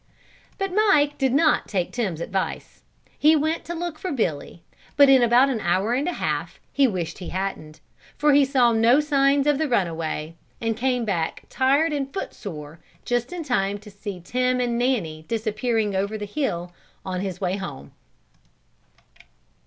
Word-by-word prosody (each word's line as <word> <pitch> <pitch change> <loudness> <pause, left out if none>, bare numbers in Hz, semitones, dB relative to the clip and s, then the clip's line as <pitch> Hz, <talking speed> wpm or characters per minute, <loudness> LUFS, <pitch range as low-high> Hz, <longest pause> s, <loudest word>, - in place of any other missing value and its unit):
But 390 -1 -3
Mike 370 -9 +3
did 265 -2 +2
not 300 +3 +3
take 185 -4 -2
Tim's 195 -10 -2
advice. 190 +2 -4 0.4
He 310 +2 +6
went 315 +2 0
to 345 - -5
look 340 -2 -4
for 370 - -4
Billy 170 - -3 0.3
but 285 -1 +7
in 265 -2 +7
about 240 +3 +5
an 235 - -2
hour 190 +5 +1
and 270 +6 0
a 355 - -1
half - - -3
he 280 -1 +4
wished 175 -6 -4
he 180 - -6
hadn't, 170 -5 -5 0.4
for 295 0 +3
he 285 0 +6
saw 260 -3 +3
no 230 +4 +4
signs 280 -2 +2
of 295 -1 +2
the 315 -2 0
runaway, 165 -7 -1 0.3
and 225 -1 -1
came 250 0 0
back 170 -6 -2
tired 285 +5 +2
and 275 -2 -2
foot 385 - -5
sore 155 -5 -8 0.3
just 245 +2 -1
in 355 -2 -4
time 205 -8 0
to 210 0 -14
see 200 -1 -7
Tim 250 +7 0
and 240 -1 0
Nanny 195 -12 -1
disappearing 220 -1 -1
over 200 +3 -1
the 210 - -5
hill 180 - -3 0.3
on 185 -1 -3
the 190 -3 -4
way 185 0 -1
home. 150 -9 -7
235 Hz, 170 wpm, -24 LUFS, 190-280 Hz, 0.4 s, but